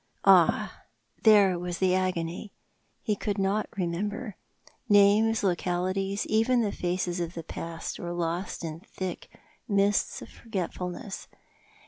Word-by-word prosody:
Ah, - - +4 0.4
there 200 -5 +6
was 175 -1 -4
the 185 0 +2
agony! 185 +1 -1 0.5
He 210 - 0
could 205 0 -3
not 195 +2 0
remember. 200 +5 -3 0.5
Names, 210 +2 +5
localities, 185 +2 0
even 230 +3 +2
the 210 -3 0
faces 180 -1 -2
of 170 0 -3
the 165 - -5
past 165 +1 -6
were 175 - -4
lost 175 +2 -3
in 160 0 -5
the - - -23
thick 185 -2 -6 0.4
mists 200 -1 +1
of - - -12
forgetfulness. 190 -2 -5
190 Hz, 125 wpm, -28 LUFS, 175-205 Hz, 0.5 s, there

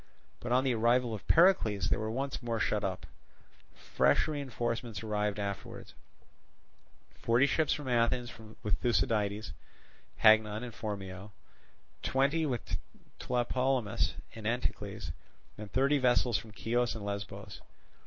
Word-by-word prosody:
But 120 - -5
on 130 +1 +4
the 130 -2 +2
arrival 120 +1 +2
of 105 - -7
Pericles, 110 - +4
they - - +5
were 110 0 -3
once 135 +4 -3
more 115 -2 -2
shut - - 0
up. - - -3 0.7
Fresh - - +2
reinforcements 120 -6 -3
afterwards 105 -1 -1 0.4
arrived—forty 120 +4 -4
ships 145 +1 +1
from 145 -3 -2
Athens 120 0 +1 0.3
with 105 - 0
Thucydides, 105 -1 0 0.7
Hagnon, 110 0 +5
and 120 -2 -7
Phormio; 100 -2 -6 0.7
twenty 140 +4 +1
with 125 -4 -3 0.4
Tlepolemus 125 -2 0 0.2
and 110 -2 -6
Anticles, 120 +2 -3 0.4
and 105 -1 -9
thirty 140 +2 +3
vessels 120 -3 +3
from 110 - -12
Chios 120 +3 0
and 105 -2 -6
Lesbos. 100 0 -6
115 Hz, 120 wpm, -31 LUFS, 105-125 Hz, 0.7 s, they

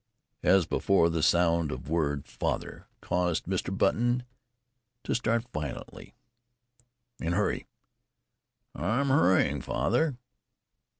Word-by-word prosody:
As 95 -1 +4
before, 85 0 +2
the 80 -1 -1
sound 85 -1 +3
of 65 - -6
the 75 - -8
word 70 -4 0
"father" - - -4
caused 90 -2 0
Mr. 95 +1 -2
Button 120 +6 +2 0.8
to - - -1
start 115 0 0
violently. 75 -3 -6 1.1
"And 85 +1 -1
hurry." 105 +1 -1 1.1
"I'm 110 - 0
hurrying, 135 -9 +3
father." 155 -6 0
90 Hz, 105 wpm, -28 LUFS, 80-115 Hz, 1.1 s, As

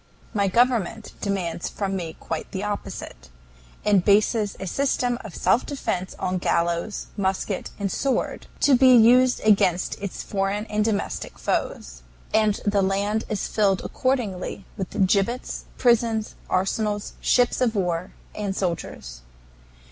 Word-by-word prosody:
"My 200 -2 +2
government 225 -1 +1
demands 185 -4 -2
from 195 -2 -3
me 165 -4 -4
quite 160 -1 -4
the 190 +1 -4
opposite, 200 - -5 0.6
and 200 -4 +4
bases 210 +1 +3
a 190 - -4
system 245 +2 0
of 215 -6 -9
self 190 +7 +2
defense 185 -10 -3
on 185 0 -1
gallows, 170 +4 0
musket, 195 -1 -1
and 200 -2 -2
sword, 270 +6 -1
to 290 - +5
be 255 0 +7
used 250 +2 +6
against 195 -5 +2
its 200 -2 -5
foreign 200 +1 -1
and 210 0 +2
domestic 215 -2 -2
foes. - - -2 0.3
And 215 -2 +3
the 205 -1 +2
land 200 +3 0
is 210 - -2
filled 195 -3 +1
accordingly 215 -8 -2
with 190 -1 0
gibbets, 205 +7 0
prisons, 230 -3 +2 0.2
arsenals, 205 +2 -1
ships 245 0 +3
of 235 -3 +2
war, 180 -2 -1 0.2
and 200 -2 -3
soldiers. 160 - -4
200 Hz, 135 wpm, -24 LUFS, 185-220 Hz, 0.6 s, be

